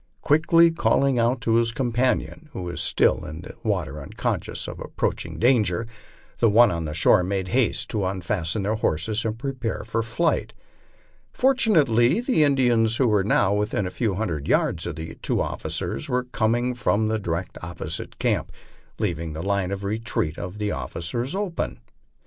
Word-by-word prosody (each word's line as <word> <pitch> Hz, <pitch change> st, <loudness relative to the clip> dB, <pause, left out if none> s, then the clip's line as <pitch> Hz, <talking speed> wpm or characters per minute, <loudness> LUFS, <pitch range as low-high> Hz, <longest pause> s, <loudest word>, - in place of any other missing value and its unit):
Quickly 165 Hz, +3 st, +5 dB
calling 140 Hz, -5 st, +2 dB
out 120 Hz, +2 st, +1 dB
to 115 Hz, 0 st, +2 dB
his 115 Hz, 0 st, +2 dB
companion, 130 Hz, +5 st, -1 dB
who 95 Hz, -, -5 dB
was 85 Hz, 0 st, -4 dB
still -, -, +2 dB
in 80 Hz, +1 st, -7 dB
the -, -, -10 dB
water 75 Hz, +3 st, -2 dB
unconscious 70 Hz, -, -3 dB
of -, -, -7 dB
approaching -, -, -3 dB
danger, 115 Hz, -5 st, +2 dB, 0.5 s
the 115 Hz, -, +4 dB
one 115 Hz, +2 st, +6 dB
on 85 Hz, -3 st, -3 dB
shore 90 Hz, +5 st, +4 dB
made 95 Hz, 0 st, -2 dB
haste 125 Hz, +3 st, +1 dB
to 105 Hz, -3 st, -1 dB
un 95 Hz, 0 st, -2 dB
fasten 95 Hz, 0 st, -1 dB
their 105 Hz, +3 st, 0 dB
horses 105 Hz, +1 st, 0 dB
and 110 Hz, 0 st, -2 dB
prepare 125 Hz, -2 st, -3 dB
for 115 Hz, +1 st, -1 dB
flight. 120 Hz, +9 st, 0 dB, 0.8 s
Fortunately 165 Hz, -, +3 dB
the 245 Hz, -, +1 dB
Indians, 120 Hz, -5 st, +3 dB
who 130 Hz, -, +3 dB
were 105 Hz, -3 st, +3 dB
now 100 Hz, 0 st, +2 dB
within 105 Hz, -1 st, 0 dB
a 90 Hz, -, -4 dB
few 100 Hz, +1 st, -1 dB
hundred 85 Hz, -9 st, -3 dB
yards 80 Hz, -, +1 dB
of 85 Hz, -, -4 dB
the 80 Hz, +1 st, -6 dB
two -, -, 0 dB
officers, 70 Hz, -, -3 dB
were 125 Hz, 0 st, +1 dB
coming 120 Hz, 0 st, 0 dB
from 110 Hz, -3 st, +1 dB
the 110 Hz, 0 st, 0 dB
di 95 Hz, -, -6 dB
rection 85 Hz, +3 st, -3 dB
opposite 80 Hz, -2 st, -5 dB
camp, -, -, 0 dB, 0.5 s
leaving 85 Hz, -6 st, -2 dB
the 80 Hz, +2 st, -5 dB
line 100 Hz, -2 st, 0 dB
of 100 Hz, 0 st, -4 dB
retreat 105 Hz, -6 st, -2 dB
of 90 Hz, +3 st, -6 dB
the 105 Hz, -1 st, -1 dB
officers 85 Hz, -, -3 dB
open. 195 Hz, -4 st, -3 dB
110 Hz, 170 wpm, -24 LUFS, 90-125 Hz, 0.8 s, one